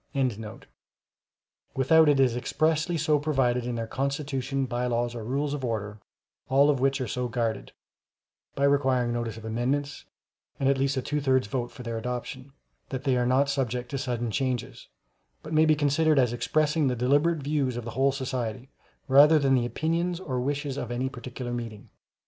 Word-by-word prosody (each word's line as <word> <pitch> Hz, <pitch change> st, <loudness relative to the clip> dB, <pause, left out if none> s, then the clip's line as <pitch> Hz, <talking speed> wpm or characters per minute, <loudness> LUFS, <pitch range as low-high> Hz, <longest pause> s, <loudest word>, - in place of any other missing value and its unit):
] 115 Hz, -6 st, -8 dB
without 155 Hz, +4 st, +5 dB
it 145 Hz, -2 st, +3 dB
is 130 Hz, -3 st, +3 dB
expressly 160 Hz, +6 st, 0 dB
so 150 Hz, -1 st, +2 dB
provided 130 Hz, -5 st, 0 dB
in 120 Hz, -, -2 dB
their 115 Hz, -1 st, -3 dB
Constitution, 135 Hz, +1 st, -2 dB
Bylaws, 120 Hz, -1 st, -1 dB
or 115 Hz, -2 st, -6 dB
Rules 140 Hz, +5 st, -1 dB
of 145 Hz, -2 st, -4 dB
Order, 105 Hz, -3 st, -3 dB, 0.5 s
all 140 Hz, +2 st, +5 dB
of 140 Hz, -, -1 dB
which 135 Hz, +1 st, +1 dB
are 130 Hz, -, -2 dB
so 125 Hz, +3 st, -2 dB
guarded 115 Hz, -2 st, -2 dB, 0.8 s
(by 140 Hz, -, -1 dB
requiring 130 Hz, -4 st, +2 dB
notice 120 Hz, -2 st, -3 dB
of 110 Hz, -, -10 dB
amendments, 130 Hz, +6 st, -2 dB, 0.5 s
and 135 Hz, -, +1 dB
at 135 Hz, -1 st, +2 dB
least 135 Hz, +1 st, 0 dB
a 130 Hz, -, -1 dB
two 150 Hz, +2 st, -2 dB
thirds 130 Hz, -2 st, +2 dB
vote 120 Hz, +3 st, -3 dB
for 125 Hz, -, -11 dB
their 115 Hz, -1 st, -3 dB
adoption) 125 Hz, +3 st, -5 dB, 0.4 s
that 130 Hz, -1 st, -4 dB
they 135 Hz, -3 st, +2 dB
are 125 Hz, -1 st, +1 dB
not 130 Hz, +3 st, +3 dB
subject 125 Hz, -3 st, -2 dB
to 135 Hz, -, -2 dB
sudden 120 Hz, -3 st, -2 dB
changes, 130 Hz, +1 st, -3 dB, 0.6 s
but 155 Hz, -, -7 dB
may 155 Hz, +1 st, +5 dB
be 155 Hz, -1 st, +4 dB
considered 150 Hz, +1 st, +2 dB
as 125 Hz, -3 st, +3 dB
expressing 150 Hz, +4 st, +1 dB
the 125 Hz, -, 0 dB
deliberate 145 Hz, +6 st, +2 dB
views 140 Hz, -4 st, -1 dB
of 120 Hz, -, -5 dB
the 115 Hz, -, -5 dB
whole 135 Hz, +3 st, +2 dB
society, 130 Hz, -2 st, -4 dB, 0.4 s
rather 145 Hz, +3 st, +7 dB
than 140 Hz, -2 st, +2 dB
the 120 Hz, -2 st, +2 dB
opinions 165 Hz, +7 st, -1 dB
or 130 Hz, -9 st, -3 dB
wishes 140 Hz, +1 st, -2 dB
of 125 Hz, -, -4 dB
any 125 Hz, +2 st, -2 dB
particular 125 Hz, -1 st, -7 dB
meeting. 115 Hz, -3 st, -7 dB
130 Hz, 180 wpm, -27 LUFS, 120-145 Hz, 0.8 s, rather